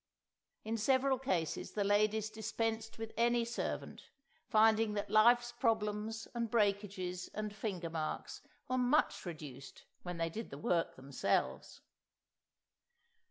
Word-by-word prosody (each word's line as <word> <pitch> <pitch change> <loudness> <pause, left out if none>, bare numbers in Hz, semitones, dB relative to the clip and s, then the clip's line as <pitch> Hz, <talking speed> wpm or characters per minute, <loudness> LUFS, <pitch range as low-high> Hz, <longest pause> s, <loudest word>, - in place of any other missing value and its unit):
In 225 +1 -2
several 260 +3 +3
cases 180 - -1
the 205 - 0
ladies 210 +1 +2
dispensed 225 +1 -2
with 225 0 -6
any 235 0 +3
servant, 235 - -4 0.4
finding 220 0 +4
that 205 -1 -3
life's 240 +3 +5
problems 220 -2 -1
and 235 -2 -2
breakages 200 -4 0
and 215 0 -3
fingermarks 170 -6 -4 0.3
were 255 0 0
much 250 +5 +2
reduced 145 -5 -8 0.2
when 180 -1 -5
they 165 0 -1
did 225 +6 -5
the 140 - -8
work 165 +3 0
themselves! 135 0 -1
215 Hz, 115 wpm, -35 LUFS, 185-230 Hz, 0.4 s, life's